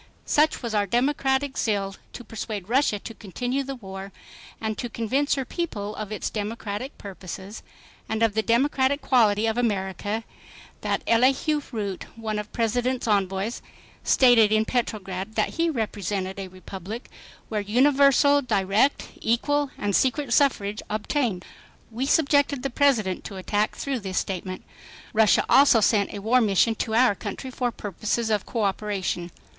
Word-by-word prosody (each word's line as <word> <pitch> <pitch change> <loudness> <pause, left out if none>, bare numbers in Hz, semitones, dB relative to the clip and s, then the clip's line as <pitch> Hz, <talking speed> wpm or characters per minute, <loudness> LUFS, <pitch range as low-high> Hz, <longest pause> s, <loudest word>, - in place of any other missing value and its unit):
Such 305 -2 +2
was 235 -2 -3
our 205 -1 +1
democratic 265 +3 +1
zeal 200 -3 0 0.2
to 245 - -8
persuade 215 -3 -6
Russia 250 -2 +2
to 225 - -9
continue 245 +6 -3
the 275 0 -5
war 195 -4 -8 0.5
and 220 -1 -2
to 240 - -3
convince 260 +6 0
her 270 -2 -2
people 215 - -4
of 215 -1 -6
its 215 - -3
democratic 215 +4 -4
purposes, 195 +1 -8 0.5
and 220 +1 0
of 225 -2 +3
the 220 - +1
democratic 265 +4 +2
quality 220 -4 +3
of 225 +1 0
America, 205 -1 -1 0.6
that - - -1
Elihu 270 +6 +3
Root, 205 -5 -4
one 220 -2 -3
of 210 - -5
the - - -34
President's 245 +2 0
envoys, 200 +1 0 0.4
stated 240 -5 +5
in 215 0 +3
Petrograd 210 -4 -3
that 215 - +1
he 335 0 0
represented 200 - -3
a 195 - -5
republic 190 +4 -8 0.4
where 215 -2 -1
"universal, 275 +5 +4
direct, 215 +2 +1
equal 290 +5 +1
and 205 -2 -1
secret 260 0 +1
suffrage 210 -7 +2
obtained." 215 -2 -1 0.5
We 250 +4 -2
subjected 285 -3 +3
the 275 - -2
President 235 -9 +2
to 200 - -7
attack 205 +3 0
through 275 -2 -2
this 190 -3 -5
statement. 185 -1 -3 0.5
Russia 220 -1 +4
also 275 -4 +6
sent 205 -1 +2
a 200 - -7
war 250 +4 +4
mission 215 +1 +3
to 220 0 -2
our 245 -2 +5
country 210 +6 -6
for 245 -1 -1
purposes 215 +2 -2
of 210 -2 0
coöperation. 200 -5 -2
220 Hz, 150 wpm, -25 LUFS, 205-255 Hz, 0.6 s, also